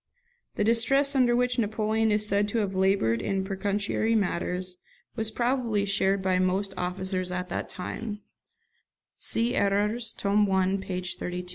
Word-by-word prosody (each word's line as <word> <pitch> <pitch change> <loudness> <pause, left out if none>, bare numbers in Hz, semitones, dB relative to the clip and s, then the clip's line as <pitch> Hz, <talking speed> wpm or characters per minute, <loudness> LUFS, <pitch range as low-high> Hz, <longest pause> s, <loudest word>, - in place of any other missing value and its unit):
The - - 0
distress 270 +6 +3
under 245 -2 +4
which 250 0 +1
Napoleon 220 0 +1
is 210 0 +2
said 205 0 +2
to 210 - -2
have 200 -3 0
laboured 190 - +2
in 195 +4 -1
pecuniary 205 +3 -1
matters 180 -2 -1 0.4
was 220 0 -1
probably 235 -3 0
shared 195 -1 +1
by 185 -1 +2
most 190 +2 0
officers 185 0 -2
at 180 0 -3
that - - -4
time; 205 +3 -5 1.0
see 235 +2 +1
'Erreurs', 210 +3 +1
tome 205 0 +2
i. 190 0 +2
p. 185 -1 -4
32. 180 0 -5
200 Hz, 145 wpm, -27 LUFS, 185-220 Hz, 1.0 s, under